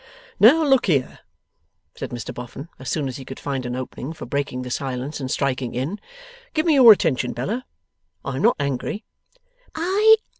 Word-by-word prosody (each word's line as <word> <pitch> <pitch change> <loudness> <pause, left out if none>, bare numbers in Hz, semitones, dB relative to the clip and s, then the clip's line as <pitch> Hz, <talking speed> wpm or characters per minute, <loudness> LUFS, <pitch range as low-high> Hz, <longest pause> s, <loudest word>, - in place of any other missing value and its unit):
'Now, 285 +10 +7
look 270 -5 +3
here,' 140 -8 0 0.7
said - - -6
Mr 120 +1 -6
Boffin, 125 +6 -8
as 130 -1 -6
soon 145 -1 -1
as 130 - -5
he 135 - -8
could 130 - -9
find 135 -3 -3
an 125 - -3
opening 130 +3 -6
for - - -8
breaking 140 -3 -2
the 125 - -6
silence 135 +3 -3
and 130 -2 -4
striking 130 -3 -1
in. 145 - -3 0.6
'Give 310 +1 +1
me 325 - +4
your 255 -5 +9
attention, 130 - +2
Bella. 245 +6 -3 0.6
I 135 -1 -3
am - - -2
not 230 - +4
angry. 140 - -3
140 Hz, 175 wpm, -22 LUFS, 130-205 Hz, 0.7 s, your